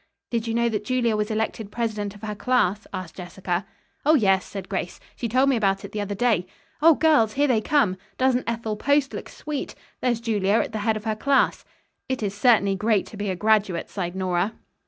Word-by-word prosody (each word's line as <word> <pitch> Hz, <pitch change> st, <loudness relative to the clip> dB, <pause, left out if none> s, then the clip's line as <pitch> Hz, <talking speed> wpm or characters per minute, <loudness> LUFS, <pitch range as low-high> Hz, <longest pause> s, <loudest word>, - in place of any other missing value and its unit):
"Did 230 Hz, -1 st, -1 dB
you 225 Hz, -, -1 dB
know 235 Hz, 0 st, +2 dB
that 210 Hz, -3 st, -1 dB
Julia 235 Hz, -1 st, +1 dB
was 210 Hz, +1 st, -1 dB
elected 220 Hz, -1 st, -2 dB
president 215 Hz, -3 st, -2 dB
of 205 Hz, -, -15 dB
her 210 Hz, -1 st, -3 dB
class?" 210 Hz, -3 st, +1 dB
asked 185 Hz, -3 st, -6 dB
Jessica. 180 Hz, 0 st, -3 dB, 0.4 s
"Oh, 310 Hz, +2 st, +5 dB
yes," 195 Hz, -7 st, +3 dB
said 195 Hz, -2 st, -7 dB
Grace, 190 Hz, -3 st, -4 dB, 0.2 s
"she 235 Hz, -, -3 dB
told 260 Hz, +4 st, +3 dB
me 275 Hz, -, +3 dB
about 195 Hz, -3 st, +1 dB
it -, -, -9 dB
the 210 Hz, -, -3 dB
other 205 Hz, 0 st, -3 dB
day. 210 Hz, -5 st, +1 dB, 0.3 s
Oh, 325 Hz, 0 st, +7 dB
girls, 285 Hz, -10 st, +3 dB
here 285 Hz, +2 st, +2 dB
they 235 Hz, -5 st, +2 dB
come! 215 Hz, -7 st, +2 dB, 0.2 s
Doesn't 255 Hz, -2 st, +1 dB
Ethel 225 Hz, -2 st, -3 dB
Post 285 Hz, +3 st, +2 dB
look -, -, -6 dB
sweet? 300 Hz, -2 st, -5 dB, 0.3 s
There's 240 Hz, -2 st, +1 dB
Julia 210 Hz, -4 st, 0 dB
at 225 Hz, -, +2 dB
the 215 Hz, -, -3 dB
head 215 Hz, +1 st, +1 dB
of 210 Hz, -, -8 dB
her 220 Hz, -1 st, 0 dB
class." 275 Hz, +5 st, +2 dB, 0.5 s
"It 260 Hz, -4 st, -2 dB
is 200 Hz, -1 st, -1 dB
certainly 205 Hz, -2 st, +4 dB
great 210 Hz, 0 st, +1 dB
to -, -, -11 dB
be 205 Hz, 0 st, -3 dB
a 185 Hz, -, -1 dB
graduate," 210 Hz, -3 st, +1 dB
sighed 180 Hz, -2 st, -3 dB
Nora. 185 Hz, +2 st, 0 dB
215 Hz, 215 wpm, -24 LUFS, 195-240 Hz, 0.5 s, Oh